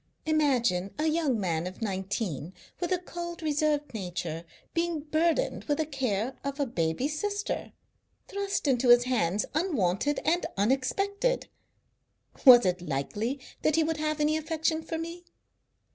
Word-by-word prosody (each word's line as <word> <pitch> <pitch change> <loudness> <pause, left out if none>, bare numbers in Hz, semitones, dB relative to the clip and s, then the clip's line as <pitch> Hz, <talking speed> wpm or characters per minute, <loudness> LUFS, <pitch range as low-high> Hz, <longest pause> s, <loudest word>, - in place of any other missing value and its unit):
Imagine 245 - +1
a 305 - 0
young 310 -7 +1
man 170 -3 -1
of 185 - -8
nineteen, 190 - -3 0.2
with 350 -1 -2
a 365 - +3
cold, 345 -1 -7
reserved 300 -1 0
nature, 175 -5 -4 0.3
being 335 -2 0
burdened 315 +2 0
with 290 -1 0
the 315 - 0
care 260 -5 -1
of 280 +1 -4
a 285 - +2
baby 170 - -1
sister, 405 +7 -3 0.6
thrust 400 -5 -2
into 255 -2 +2
his 240 0 +8
hands 210 -6 +1
unwanted 290 - +1
and 345 +3 +2
unexpected. 395 - 0 1.0
Was 245 -4 +10
it 180 -1 +1
likely 180 - -2 0.2
that 310 - +2
he 325 - +4
would 320 0 -1
have 305 0 -1
any 300 +1 +2
affection 315 0 -1
for 325 +1 -4
me? 335 +2 -6
285 Hz, 145 wpm, -28 LUFS, 205-320 Hz, 1.0 s, Was